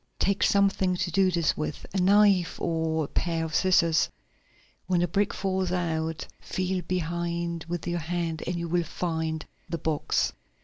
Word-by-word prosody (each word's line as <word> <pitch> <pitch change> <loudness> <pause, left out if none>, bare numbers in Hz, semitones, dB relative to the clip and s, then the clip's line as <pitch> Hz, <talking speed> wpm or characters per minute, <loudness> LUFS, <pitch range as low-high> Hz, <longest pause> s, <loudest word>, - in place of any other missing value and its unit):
Take 200 0 +1
something 195 -2 +3
to 180 -1 -2
do 190 +2 +4
this 170 -3 +1
with, 155 -1 -4
a 195 - 0
knife 195 -1 +4
or 160 -1 0
a - - -4
pair 165 0 -1
of 160 - -6
scissors. 170 -2 +3 0.8
When 180 -1 +2
the 175 - +2
brick 200 +4 +1
falls 190 -2 -1
out, 165 -3 -1
feel 185 0 -2
behind 170 -1 -2
with 175 -1 -3
your 175 0 -1
hand 165 -1 -2
and 175 - -1
you 170 0 -3
will 175 +1 +2
find 160 -2 -3 0.2
the 170 - -2
box." 155 -1 0
175 Hz, 165 wpm, -27 LUFS, 160-185 Hz, 0.8 s, do